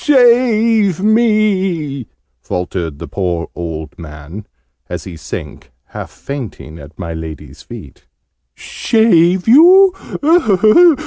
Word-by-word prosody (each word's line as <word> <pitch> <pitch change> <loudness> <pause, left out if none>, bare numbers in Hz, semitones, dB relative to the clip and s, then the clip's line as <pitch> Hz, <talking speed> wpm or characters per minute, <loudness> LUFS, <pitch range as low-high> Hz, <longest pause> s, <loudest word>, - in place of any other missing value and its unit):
"Save 230 - +3
me!" 195 - 0 0.3
faltered 90 -4 -4
the - - -8
poor 90 -4 -3
old 80 -3 -7
man, 80 +5 -10 0.4
as - - -5
he 90 - -9
sank, 75 -3 -9 0.2
half - - -8
fainting, 115 - -8
at 70 +2 -14
my 85 -3 -6
Lady's 80 -2 -9
feet. - - -13 0.5
"Shave 185 -5 +1
you? 330 - +4
170 Hz, 100 wpm, -15 LUFS, -, 0.5 s, you